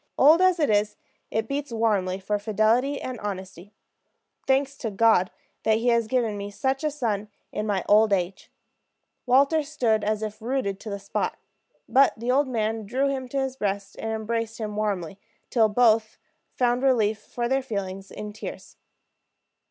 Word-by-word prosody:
Old 310 Hz, +6 st, +6 dB
as 370 Hz, -2 st, +4 dB
it 295 Hz, -7 st, +2 dB
is, 210 Hz, 0 st, +1 dB, 0.3 s
it 220 Hz, +1 st, -1 dB
beats 280 Hz, 0 st, -3 dB
warmly 205 Hz, -5 st, 0 dB
for 205 Hz, +2 st, -1 dB
fidelity 220 Hz, +7 st, +1 dB
and 255 Hz, -3 st, -5 dB
honesty. 190 Hz, -1 st, -6 dB, 0.8 s
Thanks 275 Hz, +1 st, +2 dB
to 225 Hz, -, -3 dB
God 200 Hz, -3 st, +3 dB, 0.3 s
that 220 Hz, 0 st, +3 dB
He 240 Hz, +2 st, +1 dB
has 235 Hz, -2 st, +2 dB
given 230 Hz, -4 st, 0 dB
me 200 Hz, 0 st, -5 dB
such 265 Hz, +7 st, -1 dB
a 305 Hz, -, +2 dB
son 220 Hz, -8 st, -2 dB, 0.2 s
in 210 Hz, +1 st, -3 dB
my 200 Hz, -3 st, 0 dB
lonely -, -, -8 dB
old 210 Hz, 0 st, +5 dB
age!" 185 Hz, 0 st, -2 dB, 0.8 s
Walter 280 Hz, +5 st, +4 dB
stood 240 Hz, -8 st, 0 dB
as 215 Hz, +1 st, -1 dB
if 215 Hz, 0 st, -5 dB
rooted 225 Hz, -5 st, -2 dB
to 220 Hz, -, -8 dB
the 200 Hz, -, -3 dB
spot. 200 Hz, 0 st, -3 dB, 0.5 s
But 275 Hz, +1 st, +5 dB
the 235 Hz, +3 st, -1 dB
old 275 Hz, +2 st, +3 dB
man 220 Hz, -3 st, -2 dB
drew 265 Hz, +5 st, +1 dB
him 260 Hz, -2 st, -3 dB
to 275 Hz, -, -1 dB
his 265 Hz, -1 st, -2 dB
breast 200 Hz, -4 st, -3 dB
and 225 Hz, -, -3 dB
embraced 225 Hz, +1 st, -2 dB
him 215 Hz, -2 st, -4 dB
warmly, 195 Hz, -4 st, -2 dB, 0.3 s
till 225 Hz, -3 st, +4 dB
both 220 Hz, -1 st, +3 dB, 0.4 s
found 245 Hz, 0 st, +1 dB
relief 220 Hz, -5 st, +2 dB
for 240 Hz, +2 st, -4 dB
their 265 Hz, +2 st, +1 dB
feelings 195 Hz, -5 st, -5 dB
in 210 Hz, 0 st, -7 dB
tears. 215 Hz, -, -9 dB
220 Hz, 175 wpm, -25 LUFS, 205-260 Hz, 0.8 s, Old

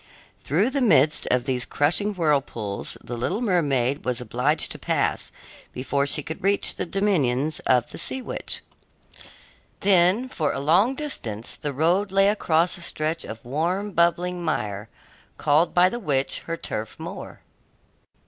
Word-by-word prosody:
Through 190 Hz, -, +1 dB
the 280 Hz, -, -1 dB
midst 155 Hz, -, +4 dB
of 125 Hz, -1 st, +1 dB
these 125 Hz, -2 st, +1 dB
crushing 185 Hz, +11 st, 0 dB
whirlpools 140 Hz, -, -1 dB
the 120 Hz, -, -6 dB
little 155 Hz, -, -2 dB
mermaid 145 Hz, -, 0 dB
was 125 Hz, -2 st, -2 dB
obliged 125 Hz, +6 st, +1 dB
to -, -, -6 dB
pass -, -, -1 dB, 0.4 s
before 140 Hz, +2 st, -1 dB
she 150 Hz, +1 st, +1 dB
could 160 Hz, -, -7 dB
reach 200 Hz, +1 st, +3 dB
the -, -, -3 dB
dominions 155 Hz, -8 st, 0 dB
of 125 Hz, -2 st, +2 dB
the -, -, -7 dB
sea 265 Hz, -, +1 dB
witch. 255 Hz, -, -3 dB, 1.2 s
Then, 190 Hz, +5 st, +3 dB
for 155 Hz, -, -2 dB
a -, -, -3 dB
long 180 Hz, -, +3 dB
distance, 120 Hz, -, -3 dB
the 145 Hz, -, -4 dB
road 175 Hz, +8 st, +1 dB
lay 195 Hz, +1 st, +4 dB
across 175 Hz, -4 st, +1 dB
a -, -, -10 dB
stretch 160 Hz, 0 st, -2 dB
of 110 Hz, +1 st, -9 dB
warm, 175 Hz, +10 st, -2 dB
bubbling 175 Hz, 0 st, +1 dB
mire, 105 Hz, -9 st, -3 dB, 0.5 s
called 155 Hz, +3 st, +2 dB
by 180 Hz, +1 st, +6 dB
the 240 Hz, +5 st, -3 dB
witch 140 Hz, -, 0 dB
her 165 Hz, 0 st, -3 dB
turf 110 Hz, -7 st, -5 dB
moor. -, -, -8 dB
160 Hz, 150 wpm, -24 LUFS, 130-190 Hz, 1.2 s, by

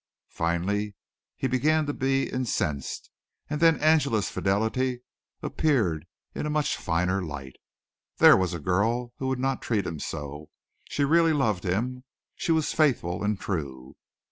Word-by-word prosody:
Finally 100 Hz, +5 st, -1 dB, 0.4 s
he -, -, -3 dB
began 150 Hz, +5 st, +2 dB
to 145 Hz, -, -2 dB
be 135 Hz, 0 st, +1 dB
incensed, 85 Hz, -, -2 dB, 0.4 s
and 150 Hz, 0 st, -2 dB
then 165 Hz, -1 st, +6 dB
Angela's 145 Hz, -9 st, +2 dB
fidelity 110 Hz, +6 st, 0 dB, 0.4 s
appeared 95 Hz, -, +1 dB, 0.3 s
in -, -, -3 dB
a -, -, -2 dB
much 150 Hz, -1 st, +1 dB
finer 90 Hz, +3 st, 0 dB
light. 70 Hz, -6 st, -7 dB, 0.6 s
There -, -, +8 dB
was 90 Hz, -2 st, 0 dB
a -, -, -5 dB
girl 115 Hz, +9 st, 0 dB
who 130 Hz, -, -3 dB
would 130 Hz, 0 st, 0 dB
not 135 Hz, 0 st, -1 dB
treat 105 Hz, -5 st, 0 dB
him 80 Hz, -3 st, -4 dB
so. 75 Hz, +1 st, -6 dB, 0.4 s
She 140 Hz, -, +1 dB
really 165 Hz, +2 st, +4 dB
loved 110 Hz, -11 st, +1 dB
him. 125 Hz, +8 st, -1 dB, 0.3 s
She -, -, -1 dB
was 160 Hz, -2 st, +1 dB
faithful 110 Hz, -, +1 dB
and 105 Hz, -1 st, 0 dB
true. 70 Hz, -9 st, -5 dB
110 Hz, 145 wpm, -27 LUFS, 90-135 Hz, 0.6 s, There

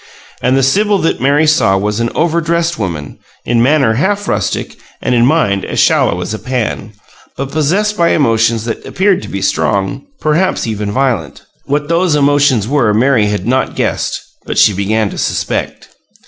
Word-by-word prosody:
And 130 Hz, -, +2 dB
the 135 Hz, -, +2 dB
Sibyl 205 Hz, +10 st, +2 dB
that 165 Hz, -8 st, -1 dB
Mary 145 Hz, +4 st, +3 dB
saw 150 Hz, -11 st, +3 dB
was 105 Hz, +2 st, -2 dB
an 115 Hz, 0 st, 0 dB
overdressed 170 Hz, 0 st, 0 dB
woman, 85 Hz, -8 st, -5 dB, 0.3 s
in 115 Hz, 0 st, +1 dB
manner 135 Hz, -2 st, +3 dB
half 200 Hz, -, -1 dB
rustic, -, -, -2 dB, 0.2 s
and -, -, -1 dB
in 120 Hz, 0 st, +3 dB
mind 105 Hz, -11 st, +1 dB
as -, -, -3 dB
shallow 85 Hz, -, +2 dB
as 90 Hz, -, -4 dB
a 110 Hz, -, -5 dB
pan, 115 Hz, -4 st, -3 dB, 0.4 s
but 135 Hz, 0 st, -4 dB
possessed 190 Hz, +8 st, 0 dB
by 170 Hz, -1 st, +3 dB
emotions 115 Hz, -4 st, +1 dB
that 115 Hz, -, -4 dB
appeared 190 Hz, 0 st, +1 dB
to -, -, -9 dB
be 100 Hz, -1 st, -4 dB
strong 100 Hz, -, -1 dB
perhaps 160 Hz, +5 st, 0 dB
even 105 Hz, -2 st, -3 dB
violent. 120 Hz, -, -2 dB, 0.2 s
What 145 Hz, +1 st, -1 dB
those 170 Hz, 0 st, +1 dB
emotions 145 Hz, -6 st, +2 dB
were 125 Hz, -6 st, +1 dB
Mary 120 Hz, -2 st, +3 dB
had 105 Hz, 0 st, -2 dB
not 130 Hz, +3 st, 0 dB
guessed, -, -, -2 dB, 0.2 s
but -, -, -5 dB
she 105 Hz, -, +5 dB
began 100 Hz, +2 st, -1 dB
to -, -, -7 dB
suspect. -, -, -3 dB
130 Hz, 175 wpm, -14 LUFS, 110-155 Hz, 0.4 s, she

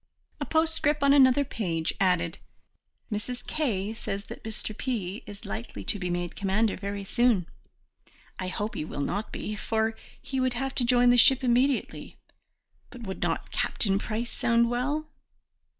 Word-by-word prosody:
A -, -, -2 dB
postscript 315 Hz, -2 st, +2 dB
on 280 Hz, 0 st, +6 dB
another 275 Hz, 0 st, +6 dB
page 170 Hz, -10 st, -1 dB
added: 180 Hz, -3 st, +1 dB, 0.7 s
"Mrs. 215 Hz, +4 st, -4 dB
K. 220 Hz, -9 st, -1 dB
says 200 Hz, -3 st, -4 dB
that -, -, -8 dB
Mr. 215 Hz, -1 st, -4 dB
P. 215 Hz, -6 st, -3 dB
is 205 Hz, +1 st, -10 dB
likely 220 Hz, +3 st, -5 dB
to 205 Hz, -, -1 dB
be 180 Hz, -1 st, -2 dB
made 175 Hz, -1 st, -2 dB
commander 205 Hz, +2 st, +1 dB
very 200 Hz, 0 st, -4 dB
soon. 235 Hz, -3 st, +2 dB, 0.9 s
I 185 Hz, -, -2 dB
hope 210 Hz, +4 st, -3 dB
he 210 Hz, -, -3 dB
will 150 Hz, -, -5 dB
not 200 Hz, +9 st, -2 dB
be, 215 Hz, -, -4 dB
for 220 Hz, +1 st, 0 dB, 0.2 s
he 265 Hz, -, -3 dB
would 255 Hz, -1 st, +1 dB
have 270 Hz, +2 st, -2 dB
to 250 Hz, -, +1 dB
join 245 Hz, 0 st, +5 dB
the 245 Hz, -, +5 dB
ship 265 Hz, +2 st, +6 dB
immediately, 255 Hz, +2 st, +1 dB, 0.7 s
but 250 Hz, -2 st, -10 dB
would 190 Hz, -3 st, -5 dB
not -, -, -1 dB
Captain 195 Hz, -2 st, +1 dB
Price 230 Hz, +3 st, -3 dB
sound 235 Hz, 0 st, +2 dB
well?" 285 Hz, +6 st, 0 dB
225 Hz, 160 wpm, -28 LUFS, 195-250 Hz, 0.9 s, on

